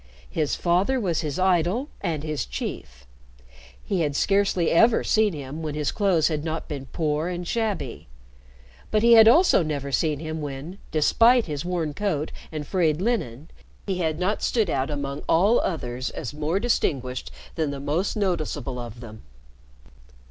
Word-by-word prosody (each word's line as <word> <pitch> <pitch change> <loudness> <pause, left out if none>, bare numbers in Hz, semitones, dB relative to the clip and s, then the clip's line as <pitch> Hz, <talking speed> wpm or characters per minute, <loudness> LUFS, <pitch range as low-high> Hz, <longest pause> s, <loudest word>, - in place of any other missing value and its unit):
His 155 -3 0
father 185 +10 +1
was 180 -8 0
his 150 -3 -3
idol 185 - +1
and 160 -6 -2
his 155 -2 -3
chief. - - -6 0.8
He 195 - -1
had 145 -3 -1
scarcely 195 -1 +2
ever 225 +7 +4
seen 215 -3 +2
him 145 +1 -6
when 155 -2 -4
his 150 -1 -1
clothes 185 -7 +2
had 155 -2 -2
not 160 0 -4
been 140 -3 -6
poor 155 +1 -1
and 175 -1 -4
shabby, 220 - -2 0.8
but 215 0 +1
he 235 0 +7
had 225 -1 +9
also 330 - +6
never 145 -3 -3
seen 150 +1 +1
him 155 +1 -5
when, 145 +6 -6
despite 230 +10 +4
his 145 -3 -4
worn 170 -4 -2
coat 155 -4 -2 0.2
and 155 -2 -5
frayed 160 -3 +1
linen, 165 - -2 0.3
he 190 -2 -2
had 160 -3 0
not 185 +4 -1
stood 220 -8 +1
out 135 +1 0
among 140 -1 -4
all 200 +8 +4
others 130 -7 -3
as 120 - -6
more 155 +5 -1
distinguished 135 - -1 0.2
than 160 -3 -1
the 140 -1 -5
most 155 +10 -1
noticeable 155 - -2
of 120 -1 -8
them. 110 -2 -10
160 Hz, 165 wpm, -24 LUFS, 145-195 Hz, 0.8 s, had